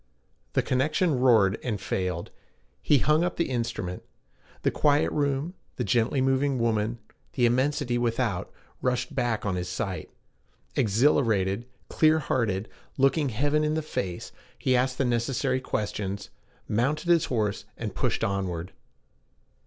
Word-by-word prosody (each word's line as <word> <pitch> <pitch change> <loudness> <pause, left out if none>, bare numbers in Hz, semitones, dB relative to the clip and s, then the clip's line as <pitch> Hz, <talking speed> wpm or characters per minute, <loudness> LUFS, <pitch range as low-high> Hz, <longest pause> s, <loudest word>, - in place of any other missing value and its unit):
The - - +2
connection 145 +3 +1
roared 110 -6 +4
and 110 -5 -2
failed. 90 -3 -2 0.5
He 145 - +4
hung 150 +5 +3
up 180 - -1
the 170 -5 -1
instrument. 115 -7 -3 0.6
The - - +3
quiet 145 0 +2
room, 145 +3 0 0.2
the - - -2
gently 125 +2 +2
moving 135 +1 +2
woman, 115 -1 0 0.4
the 125 - +2
immensity 130 +1 +1
without, 115 -5 -1 0.3
rushed 125 -1 -1
back 115 -3 -1
on 95 -3 0
his 90 0 -3
sight. - - -3 0.7
Exhilarated, 110 -2 +2 0.2
clear 155 0 +4
hearted, 115 -8 0 0.3
looking 135 +2 +3
heaven 145 +6 +1
in 150 0 +1
the 160 - -1
face, 95 - -4 0.3
he 130 - +1
asked 130 +1 +1
the 135 - +1
necessary 125 +2 0
questions, 100 -4 -3 0.4
mounted 145 - 0
his 170 -2 +5
horse, 105 -5 -1
and - - -4
pushed - - -1
onward. 95 -3 -2
125 Hz, 135 wpm, -27 LUFS, 105-140 Hz, 0.7 s, his